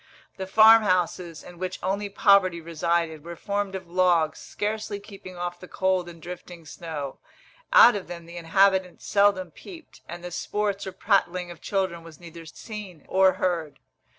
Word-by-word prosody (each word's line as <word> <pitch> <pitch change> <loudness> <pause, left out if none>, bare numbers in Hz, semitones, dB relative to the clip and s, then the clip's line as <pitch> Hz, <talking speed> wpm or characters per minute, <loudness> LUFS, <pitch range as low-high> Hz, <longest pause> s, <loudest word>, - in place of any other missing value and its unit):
The 190 -1 -5
farm 220 +3 +7
houses, 180 -4 -1
in 175 -1 -13
which 185 0 -4
only 200 +2 -1
poverty 195 -3 +4
resided, 165 -1 -1
were 170 +1 -8
formed 200 +2 -3
of 185 -2 -7
logs 175 -3 +2
scarcely 210 -1 -4
keeping 195 -3 -12
off 175 0 -4
the 180 - -11
cold 185 -2 0
and 170 -1 -12
drifting 175 0 -10
snow: 150 -4 -7 0.5
out - - +8
of 200 - -5
them 170 -1 -8
the 170 +1 -10
inhabitants 190 +2 +2
seldom 200 -3 +2
peeped, 330 - -13
and 175 +1 -8
the 180 - -6
sports 200 +2 -2
or - - -4
prattling 180 -3 0
of 170 - -12
children 190 -4 -2
was 165 -2 -13
neither 170 -1 -11
seen 195 -2 -9
or 190 0 +4
heard. 170 -6 -2
180 Hz, 165 wpm, -25 LUFS, 170-200 Hz, 0.5 s, out